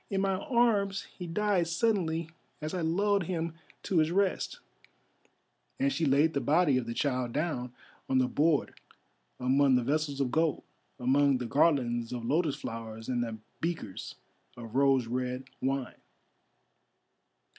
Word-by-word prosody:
In 195 - 0
my 195 0 +1
arms 210 -6 +2
he 180 - -6
died 190 0 +1
suddenly 170 -4 0 0.3
as 155 +2 -5
I 180 - -1
lulled 195 +4 +1
him 165 -2 -2 0.3
to 180 - +1
his 155 0 +3
rest," 200 - 0 1.2
and 275 +1 +2
she 165 - 0
laid 145 +4 +4
the 140 - 0
body 150 -3 +3
of 120 - -6
the 115 - -4
child 125 -4 -1
down 145 -6 -2 0.4
on 130 - +3
the 130 -1 +3
board 150 +2 +1 0.7
among 130 +1 +4
the 125 - +2
vessels 145 +1 -1
of 130 -3 0
gold, 160 0 +1 0.3
among 135 +2 +3
the 125 - -4
garlands 120 -4 +2
of 120 -2 -4
lotus 155 +2 +1
flowers 115 0 -7
and 120 -1 0
the 115 -2 -5 0.2
beakers 160 - -4 0.4
of 115 -2 -9
rose 135 -2 +4
red 125 +2 -2 0.2
wine. 135 -1 -2
145 Hz, 145 wpm, -30 LUFS, 125-175 Hz, 1.2 s, laid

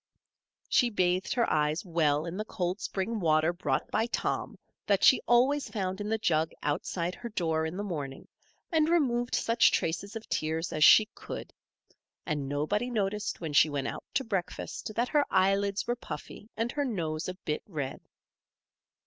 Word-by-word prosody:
She 245 - +3
bathed 185 -3 +1
her 240 -2 +2
eyes 150 +4 +1
well 155 -3 +1
in 170 +1 -5
the 215 +2 -3
cold 180 -1 -3
spring 210 +4 -2
water 160 -1 +3
brought 175 - -2
by 225 - +1
Tom - - -2 0.3
that 200 -2 +2
she 260 - +7
always 260 +4 +3
found 190 -2 -3
in 205 - -3
the 220 - +1
jug 160 -7 +1
outside 170 +4 -1
her 235 +3 -7
door 160 -6 0
in 170 +3 -6
the 205 - -2
morning, 145 -9 -5 0.4
and 315 -1 +3
removed 250 -8 +2
such 230 +1 +4
traces 185 +6 -1
of 225 - -7
tears 160 +2 -2
as 155 - +2
she 215 - +9
could; - - -8 0.7
and 145 -4 -2
nobody 175 - -1
noticed 210 -4 -2
when 160 -3 -4
she 150 +2 +6
went 140 -2 -2
out - - -5
to 270 - +2
breakfast 200 -1 -4
that 240 +2 0
her 295 -2 +3
eyelids 195 +1 +2
were 240 - 0
puffy 205 +1 -9
and 230 +2 -1
her 290 - -1
nose 165 - -2
a 185 - -5
bit 155 -5 -3
red. 150 -8 -4
190 Hz, 175 wpm, -29 LUFS, 160-225 Hz, 0.7 s, she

